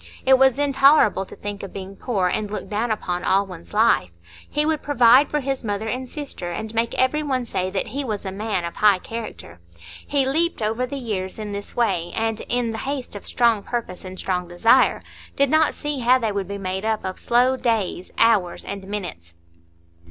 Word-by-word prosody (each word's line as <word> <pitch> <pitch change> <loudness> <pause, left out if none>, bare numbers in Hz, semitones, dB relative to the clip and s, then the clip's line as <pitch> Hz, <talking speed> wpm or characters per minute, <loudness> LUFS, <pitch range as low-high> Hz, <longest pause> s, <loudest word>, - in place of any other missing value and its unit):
It 265 0 +6
was 265 -1 +5
intolerable 275 -8 +4
to - - -11
think 205 0 -6
of 195 - -8
being 195 0 -7
poor 195 -5 -1
and 210 +3 -1
looked 210 - -6
down 220 +3 0
upon 180 -5 -2
all 195 +1 +3
one's 180 -3 -11
life. 210 - +3 0.4
He 295 0 +1
would 315 -1 0
provide 255 0 +5
for 295 - -1
his 270 -1 -3
mother 210 0 -2
and 255 +3 -3
sister, 275 - -5
and 220 +6 -5
make 230 +1 0
every 260 +4 +2
one 260 -4 -1
say 185 -4 -2
that 190 0 -2
he 280 +2 -3
was 215 -5 -4
a 190 - -3
man 200 -2 -2
of 170 - -7
high 205 -2 +5
character. 220 - -8 0.5
He 280 -2 +2
leaped 320 +5 +1
over 225 +3 -1
the 280 +2 -5
years 200 -7 -4
in 210 -1 -5
this 200 0 -7
way, 185 -8 0
and, 225 0 -1
in 245 -2 +1
the 220 - -5
haste 270 -5 -4
of 205 - -8
strong 235 -4 +2
purpose 225 -6 -5
and 185 0 -8
strong 180 -2 -2
desire, 225 +9 +3 0.3
did 280 -1 +2
not 315 0 +3
see 295 -2 -3
how 250 +1 +4
they 225 -4 -1
would 200 -2 -3
be 200 0 -5
made 190 0 -3
up 220 -2 -1
of 185 0 -4
slow 250 +2 +3
days, 220 -7 -1
hours, 205 -7 +2
and 195 -1 -6
minutes. 175 - -6
220 Hz, 205 wpm, -22 LUFS, 195-255 Hz, 0.5 s, It